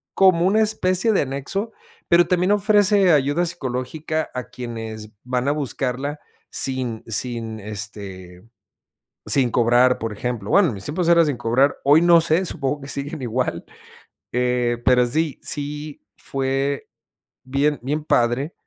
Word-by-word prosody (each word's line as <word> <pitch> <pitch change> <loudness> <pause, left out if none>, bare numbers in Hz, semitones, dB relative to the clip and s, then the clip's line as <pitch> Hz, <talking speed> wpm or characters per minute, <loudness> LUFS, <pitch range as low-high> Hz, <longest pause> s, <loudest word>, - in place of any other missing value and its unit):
como 185 -3 +4
una 215 +3 +3
especie 215 0 +1
de - - +3
anexo, 140 - -3 0.4
pero, 175 0 +5
también 180 +1 +1
ofrece 205 -2 +4
ayuda 145 +4 +2
psicológica, 155 +1 -3
a 125 - -3
quienes 115 -3 -7
van 125 +1 -2
a - - +3
buscarla 140 0 -3 0.3
sin 130 -4 -1
sin, 115 -1 -2
este, 100 -3 -7 0.8
sin 130 -4 +3
cobrar, 120 +2 +3
por 115 -1 -4
ejemplo. 110 -1 -4
Bueno, 195 -4 +5
en 115 - -3
mis 100 - -9
tiempos 170 +3 -2
era 170 -1 +6
sin 145 -4 -1
cobrar 120 +4 +2
hoy 150 +4 +5
no 170 -1 +6
sé, 165 +3 +1
supongo 145 -2 -3
que 140 - -9
siguen 145 +1 -4
igual, 120 -8 -2 0.7
eh, 125 -1 +1
pero 125 -1 +4
sí 155 +3 -2
sí 150 +1 -5 0.2
fue 135 +1 -2 0.6
bien 140 +3 0
bien 150 +3 -2
padre. 125 +6 +1
135 Hz, 140 wpm, -22 LUFS, 120-160 Hz, 0.8 s, era